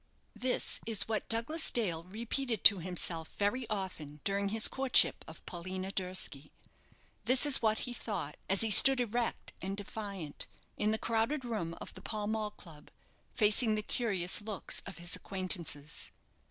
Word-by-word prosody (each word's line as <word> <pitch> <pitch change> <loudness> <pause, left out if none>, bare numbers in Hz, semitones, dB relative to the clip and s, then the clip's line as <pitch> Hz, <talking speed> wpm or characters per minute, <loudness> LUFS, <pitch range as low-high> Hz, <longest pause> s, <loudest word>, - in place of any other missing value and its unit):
This 255 0 0
is 220 -3 -2
what 220 -1 -3
Douglas 235 +9 0
Dale 175 -9 -2
repeated 230 +4 -4
to 200 - +8
himself 170 -2 -1
very 220 +4 -1
often 180 -8 -6
during 200 0 -1
his 220 +1 +4
courtship 265 -1 +3
of - - -12
Paulina 185 +2 -6
Durski. 180 -7 -4 0.7
This 255 +3 +5
is 290 -2 +6
what 220 -1 +1
he 245 - -6
thought 190 -11 -5
as 195 0 +5
he 225 -1 +2
stood 270 +5 +10
erect 240 0 -3
and 195 +1 -4
defiant 200 -6 -6 0.3
in 210 - -1
the 220 - 0
crowded 230 +6 -1
room 200 -8 -4
of - - -10
the 185 - -13
Pall 210 0 -5
Mall 215 0 -2
club, 165 -7 -14 0.5
facing 215 +1 +4
the 215 - -2
curious 200 -6 0
looks 210 -1 -2
of 195 - -8
his 175 0 -1
acquaintances. 175 -6 -5
205 Hz, 155 wpm, -31 LUFS, 185-225 Hz, 0.7 s, stood